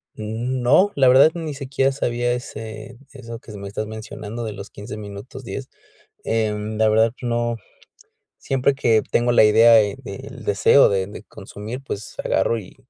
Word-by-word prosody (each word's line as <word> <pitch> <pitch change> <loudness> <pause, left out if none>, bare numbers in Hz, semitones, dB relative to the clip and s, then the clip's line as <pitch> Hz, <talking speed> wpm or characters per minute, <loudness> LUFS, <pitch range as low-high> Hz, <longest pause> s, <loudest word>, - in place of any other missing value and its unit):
Mm, 115 +4 -3
no, 150 +12 +4
la 135 -2 +4
verdad, 135 +5 +7
ni 160 -3 -4
siquiera 135 -1 0
sabía 120 -2 -1
ese 110 -2 -7 0.2
eso 115 -4 -9
que 115 - -13
me 100 - -7
estás 110 +2 -4
mencionando 110 +1 -7
de 110 -2 -4
los 100 0 -9
15 105 +1 -8
minutos 105 +5 -9
10. 125 +4 -6 0.6
Em, 110 -1 -1
la 110 0 +4
verdad, 110 +1 +3
no. 120 -1 -1 0.8
Siempre 135 +1 +1
que 115 -5 +2
tengo 120 0 +2
la 120 - +6
idea 115 +2 +6
de 105 -3 +4
del 130 +4 -9
deseo 105 +7 +5
de 95 -1 0
de 105 +1 -10
consumir, 110 +4 -8
pues, 105 -5 -7
agarro, 115 - +1
y 100 - -12
115 Hz, 165 wpm, -22 LUFS, 105-130 Hz, 0.8 s, verdad